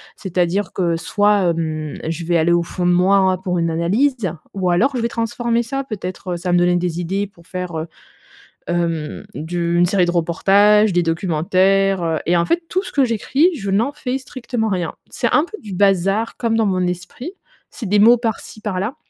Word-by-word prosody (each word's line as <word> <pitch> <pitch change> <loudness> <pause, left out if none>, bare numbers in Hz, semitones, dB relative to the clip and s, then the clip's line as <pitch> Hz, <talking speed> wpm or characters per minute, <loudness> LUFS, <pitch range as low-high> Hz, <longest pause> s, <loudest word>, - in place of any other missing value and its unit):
C'est-à-dire 185 +1 -1
que 175 -3 0
soit, 205 0 +2
mmh, 155 -2 -4
je 165 +1 -4
vais 170 0 +2
aller 165 +2 +2
au 170 0 +2
fond 175 +1 -4
de 180 - +4
moi, 185 +3 +4
hein, 190 -1 +3
pour 180 -1 -2
une 165 0 0
analyse, 195 - 0 0.2
ou 190 -2 -1
alors 225 +11 +2
je 245 - -1
vais 230 - +1
transformer 235 +1 -1
ça. 270 +4 -3
Peut-être 185 -6 -5
ça 180 +1 -4
va - - +2
me - - +5
donner 175 0 +3
des 175 -1 -2
idées 195 +4 -2
pour 170 -4 -22
faire, 180 -2 -5
heu, 160 +1 -4 0.8
hem, 165 -3 -2
du 170 +2 -2
une 175 - +5
série 185 0 +2
de 175 - 0
reportages, 200 +5 +3
des 175 0 +2
documentaires, 185 +3 +1
heu 165 -2 0
et 175 +1 +2
en 170 - +2
fait, 340 - +1
tout 375 +1 0
ce - - -8
que 280 - +2
j'écris, 265 - +2
je 200 -8 -4
n'en 225 +8 +1
fais 265 -3 -3
strictement 245 -4 -4
rien. 180 -4 -2 0.2
C'est - - -1
un 300 - +5
peu 430 - -9
du 210 -4 -8
bazar 195 +3 +1
comme 230 -2 0
dans 225 - +2
mon 185 -2 +1
esprit, 180 - -6 0.4
c'est 220 - -7
des 205 +1 +3
mots 235 +4 +7
par-ci 225 -2 -4
par-là. 210 +4 -3
190 Hz, 205 wpm, -19 LUFS, 175-220 Hz, 0.8 s, mots